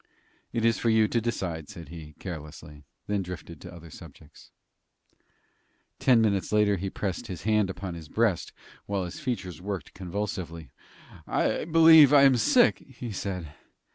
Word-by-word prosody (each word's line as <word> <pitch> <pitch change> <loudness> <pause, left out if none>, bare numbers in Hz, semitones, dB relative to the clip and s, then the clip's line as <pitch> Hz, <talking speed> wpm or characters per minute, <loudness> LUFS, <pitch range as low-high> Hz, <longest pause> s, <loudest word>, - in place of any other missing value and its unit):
"It 115 -1 -1
is 115 0 +2
for 115 - +1
you 110 -1 +4
to 115 +2 0
decide," 90 -9 -4
said 85 -4 -10
he, 80 -2 -10
carelessly, 75 -3 -9 0.2
then 105 -1 -1
drifted 85 -3 -8
to 90 - -10
other 85 -2 -12
subjects. - - -15 1.5
Ten 125 -3 +4
minutes 100 -4 0
later 105 -1 +3
he 95 +2 -3
pressed 95 -1 -4
his 90 -3 -7
hand 105 -2 +2
upon 95 -1 -6
his 80 -2 -10
breast, 110 -6 0 0.4
while 100 -2 -2
his 90 - -8
features 95 - -4
worked 100 -1 -5
convulsively. 90 -5 -5 0.6
"I - - 0
believe 160 -3 +7
I 140 -1 +7
am 135 -2 +6
sick," 245 - +4
he 125 -3 -9
said. 90 -6 -5
95 Hz, 155 wpm, -27 LUFS, 85-115 Hz, 1.5 s, believe